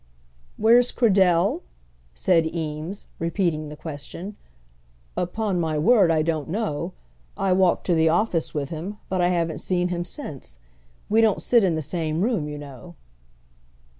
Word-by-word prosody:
"Where's 240 +2 +5
Cradell?" 190 -7 +3 0.5
said 165 - +3
Eames, 160 +3 -5
repeating 165 -3 -1
the 150 - -8
question. 165 +6 -7 0.8
"Upon 190 +1 -1
my 160 -2 0
word, 195 +2 +5
I 160 -1 +3
don't 160 -2 -2
know. 185 -6 -2 0.4
I 195 - +1
walked 185 -1 +2
to 180 - +2
the 160 -1 +4
office 170 -1 +1
with 145 -2 -3
him, 175 +6 -5
but 185 -1 0
I 175 - +4
haven't 165 -4 0
seen 180 0 0
him 175 -1 -2
since. 145 - -7 0.5
We 220 +2 +4
don't 220 -3 +3
sit 235 -3 +4
in 180 -4 +2
the 160 - -2
same 155 +2 -2
room, 215 -10 0
you 150 0 -6
know." 145 +4 -11
170 Hz, 150 wpm, -24 LUFS, 155-195 Hz, 0.8 s, Where's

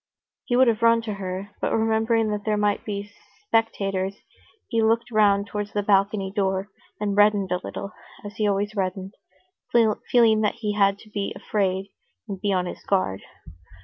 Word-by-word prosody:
He 245 - 0
would 255 +1 +5
have 230 -1 +1
run 230 0 +4
to 215 -2 -3
her, 195 +1 -5
but - - 0
remembering 225 0 +1
that 205 -1 -3
there 215 0 0
might 205 -1 +1
be 205 -1 -5 0.3
spectators, 195 - 0 0.5
he 230 -3 0
looked 230 +2 +1
round 200 -2 +3
towards 205 0 -5
the 205 - 0
balcony 195 -1 +2
door, 195 -1 0 0.3
and 205 -1 -1
reddened 205 -2 +3
a 180 0 0
little, 200 - -6 0.3
as 205 - -8
he 215 - +1
always 205 +1 -1
reddened, 190 0 -3 0.6
feeling 225 0 +3
that 210 - +1
he 210 -2 -2
had 200 -1 +3
to 215 - -17
be 200 -1 -3
afraid 195 -2 -1 0.4
and 195 -2 -6
be 205 - 0
on 180 -2 +1
his - - -7
guard. 185 - 0
205 Hz, 175 wpm, -24 LUFS, 195-220 Hz, 0.6 s, would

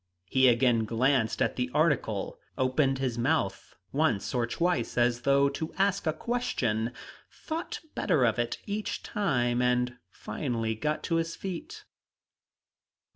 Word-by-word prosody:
He 130 +7 +4
again 120 -2 +4
glanced 120 +1 +2
at - - -1
the 125 0 0
article, 150 -10 +1 0.2
opened 135 +1 +2
his 125 -3 -2
mouth 120 - 0 0.2
once 140 -8 +1
or 120 -2 +1
twice 170 -3 0
as 120 0 +2
though 140 +2 +4
to 155 +3 -5
ask 195 -2 +1
a - - +4
question, 125 - -1 0.4
thought 325 +1 -5
better 130 -5 +2
of 115 0 +1
it 120 0 -1
each 210 +1 -3
time, 125 -12 0
and 125 0 +1
finally 115 +1 -3
got 150 +8 -2
to 165 - +1
his 165 0 -1
feet. 185 -3 -6
130 Hz, 135 wpm, -29 LUFS, 120-160 Hz, 0.4 s, He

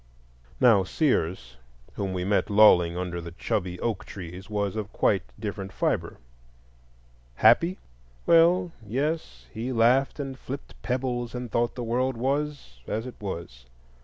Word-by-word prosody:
Now 110 -6 +6
Sears, 90 - -1 0.4
whom 100 -2 -3
we 90 -1 -2
met 100 +1 +2
next - - -19
lolling 90 -5 +6
under 90 -1 -3
the 85 0 -8
chubby 90 0 -2
oak 115 -5 -1
trees, 90 +1 -9
was 105 -1 -1
of 105 -4 -4
quite - - +2 0.2
different 95 -1 -5
fibre. - - -1 1.2
Happy?—Well, 165 - +3
yes; 125 - -3
he 120 +4 -3
laughed 125 +5 +3
and 135 -2 -5
flipped 135 +2 -7
pebbles, 125 -1 -2
and 125 -2 -5
thought 120 0 0
the 125 - -4
world 125 +2 0
was 135 - -2
as 110 +2 -2
it 125 - -7
was. 85 -11 -7
110 Hz, 135 wpm, -26 LUFS, 90-130 Hz, 1.2 s, Now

